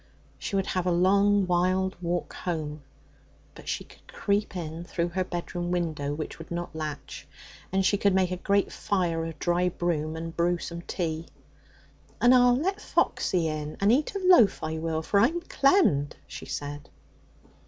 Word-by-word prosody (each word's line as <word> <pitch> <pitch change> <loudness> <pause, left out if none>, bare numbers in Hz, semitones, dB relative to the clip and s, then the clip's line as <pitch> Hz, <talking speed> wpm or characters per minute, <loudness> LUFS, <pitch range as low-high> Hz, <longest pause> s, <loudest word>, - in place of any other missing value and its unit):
She - - -4
would 195 -1 +1
have 185 -1 -1
a - - +3
long, 200 +3 +4
wild 185 +1 +1
walk 175 0 -2
home, 155 -4 -4 0.7
but - - -14
she - - -2
could - - -20
creep 205 0 -1
in 165 -1 -5
through 175 0 -2
her 185 +2 -1
bedroom 175 0 -4
window, 160 -5 -1
which 155 +1 -6
would 165 - -10
not 175 -1 -5
latch, 155 -2 -6 0.4
and 190 0 +1
she 205 +1 +2
could 200 -2 +3
make 185 -1 +2
a 180 - -2
great 200 +2 +1
fire 175 -5 -1
of 165 -1 -6
dry 175 +3 +1
broom 160 -3 -2
and 165 0 -6
brew 175 +1 +2
some 170 0 -6
tea. 165 -2 -3 0.9
'And 245 +1 +6
I'll 245 -1 +6
let 385 +8 -1
Foxy 175 -3 +1
in 155 -1 -4
and 200 +2 +4
eat 295 - +1
a - - 0
loaf, 350 - +6
I 160 0 -2
will, 160 0 -2
for 200 - +2
I'm 300 +11 +3
clemmed!' 275 - +2
she - - -9
said. 145 0 -5
175 Hz, 175 wpm, -27 LUFS, 160-200 Hz, 0.9 s, And